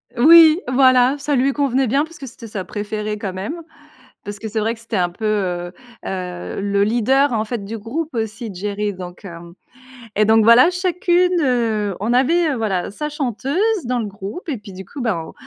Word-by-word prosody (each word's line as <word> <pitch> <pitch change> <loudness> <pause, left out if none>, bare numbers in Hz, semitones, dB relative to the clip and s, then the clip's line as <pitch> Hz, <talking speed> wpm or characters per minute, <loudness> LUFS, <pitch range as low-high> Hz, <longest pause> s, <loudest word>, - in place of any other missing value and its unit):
Oui! 320 +5 +7
Voilà! 255 +1 +4
Ça 285 0 -1
lui 265 +2 +2
convenait 270 -2 0
bien 280 +6 +1
parce 335 +2 -15
que 275 - -8
c'était 230 0 -11
sa 200 -3 -5
préférée 210 +2 -4
quand 195 -3 -5
même. 220 - -5 0.6
Parce 205 0 -7
que, 220 - -6
c'est 220 0 -2
vrai 225 +2 0
que, 225 - -13
c'était 230 -1 -6
un 175 -2 +1
peu, 215 +5 -7
heu, 180 -4 -1 0.3
heu, 180 0 -5
le 200 0 +1
leader, 255 +4 +2
en 215 -1 0
fait, 220 -3 -5
du 225 +2 -5
groupe 285 +8 -5
aussi 220 -1 -4
Geri 205 +2 -3
donc, 180 +1 -10
hem 170 -1 -10 0.6
et 215 - +3
donc, 220 0 +4
voilà. 235 +8 +7
Chacune, 360 0 +1
heu, 225 -7 0
on 225 +4 0
avait, 315 +5 +3
heu, - - -1
voilà, 195 -5 -2
sa 300 +7 -4
chanteuse 275 - -3 0.3
dans 250 +1 -1
le 220 - -2
groupe 205 - -8
et 275 -6 -2
puis, 210 -1 -12
du 190 0 -9
coup, 275 - -8
ben, 180 -9 -2
225 Hz, 200 wpm, -19 LUFS, 200-275 Hz, 0.6 s, Oui